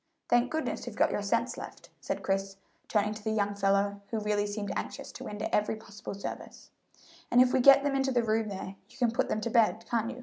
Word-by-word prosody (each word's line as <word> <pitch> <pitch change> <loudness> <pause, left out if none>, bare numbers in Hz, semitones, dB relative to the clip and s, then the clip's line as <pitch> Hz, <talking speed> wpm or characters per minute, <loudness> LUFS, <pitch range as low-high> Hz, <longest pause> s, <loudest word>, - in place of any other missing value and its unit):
"Thank 240 +1 +3
goodness 315 +2 -3
you've - - -6
got - - +3
your - - -1
senses - - 0
left," - - -10
said - - -4
Chris, 195 0 -1 0.3
turning 210 0 +1
to 215 0 -10
the 220 - -1
young 205 -2 0
fellow, 200 0 +1
who 225 - -1
really 210 -1 0
seemed 205 0 -4
anxious - - -5
to - - -9
render 210 0 -4
every 210 +1 +1
possible 210 -2 -9
service; 200 - -8 0.6
"and 245 - +4
if 255 0 +5
we - - +4
get 275 +2 +8
them 285 -1 +1
into 270 0 +1
the 240 -2 +2
room 220 0 +1
there 195 0 -6
you - - -17
can 245 -3 +2
put 235 - 0
them 215 - -1
to 235 - -2
bed, 225 -1 +3
can't 230 -1 0
you? 255 0 -7
215 Hz, 235 wpm, -30 LUFS, 205-240 Hz, 0.6 s, get